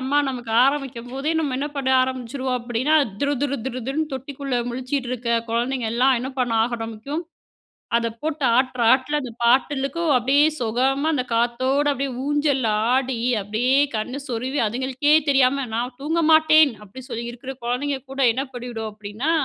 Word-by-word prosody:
அம்மா 270 +3 +1
நமக்கு 245 -3 -5
ஆரம்பிக்கும்போதே, 270 0 -2
நம்ம 280 -5 -1
என்ன 290 +2 -2
பண்ண 265 -1 0
ஆரம்பிச்சுருவோம் 255 0 -3
அப்பிடின்னா 245 +6 +1 0.3
துரு, 285 +1 +2
துரு, 280 -1 0
துரு, 255 -1 -4
துருன்னு 300 +1 -2
தொட்டிக்குள்ள 265 -1 -3
முழிச்சிட்டு 255 +1 -3
இருக்க 235 -1 -2 0.2
குழந்தைங்க 240 +1 -1
எல்லாம், 260 +3 +4
என்ன 260 +2 -4
பண்ண 245 -2 0
ஆரம்பிக்கும், 235 +7 -5 0.7
அத 230 0 -1
போட்டு 310 -2 -3
ஆட்டுற 255 -2 0
ஆட்ல 270 +3 +2
அந்த 250 -3 -6
பாட்டுக்கும் 275 +6 +2
அப்பிடியே 275 +5 +3
சொகமா 260 +6 0
அந்த 255 -4 0
காத்தோட 255 +5 +1
அப்படியே 275 -1 -2
ஊஞ்சல்ல 290 -4 +1 0.3
ஆடி, 260 -2 0 0.2
அப்படியே 220 +6 0 0.2
கண்ணு 255 +6 -4
சொருவி, 255 +4 -2
அதுங்களுக்கே 260 +5 0 0.2
தெரியாம 270 0 +3
"நான் 245 +2 -3
தூங்க 325 +4 0
மாட்டேன்" 315 -2 +6
அப்படி 210 +6 -11
சொல்லி 235 0 -4
இருக்கிற 255 +3 -8
குழந்தைங்க 265 +3 -1
கூட 270 0 -3
என்ன 270 +3 -2
பண்ணிடும் 235 -3 -5
அப்படின்னா, 215 +9 -3
260 Hz, 150 wpm, -22 LUFS, 240-280 Hz, 0.7 s, மாட்டேன்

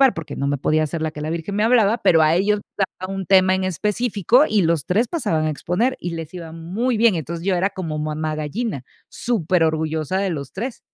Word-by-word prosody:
porque 165 - -6
no 140 - -1
me 145 0 0
podía 155 +3 +1
hacer 155 +2 -3
la 160 -1 -1
que 150 - -8
la 155 - -3
virgen 170 +4 -4
me 210 - +1
hablaba, 225 -1 +4
pero 160 -2 +4
a 155 +1 +4
ellos 205 +3 +2 0.2
les 195 - +2
daba 185 +1 -5
un 195 -1 -4
tema 185 0 +5
en 190 0 -1
específico 210 - +2
y 210 -2 +3
los 165 -3 +1
3 220 +6 +1
pasaban 160 - 0
a - - +1
exponer 180 - -1
y 175 - -4
les 165 0 -6
iba 170 -3 -8
muy 205 +9 -2
bien. 225 -3 +4
Entonces, 165 +2 -5
yo 195 - +2
era 185 +3 +1
como 160 -6 -4
mamá 155 0 -2
gallina, 155 - -3 0.3
súper 185 -7 0
orgullosa 160 +1 -1
de 195 - 0
los 140 -4 -6
3. 235 +5 -4
175 Hz, 230 wpm, -21 LUFS, 155-205 Hz, 0.3 s, tema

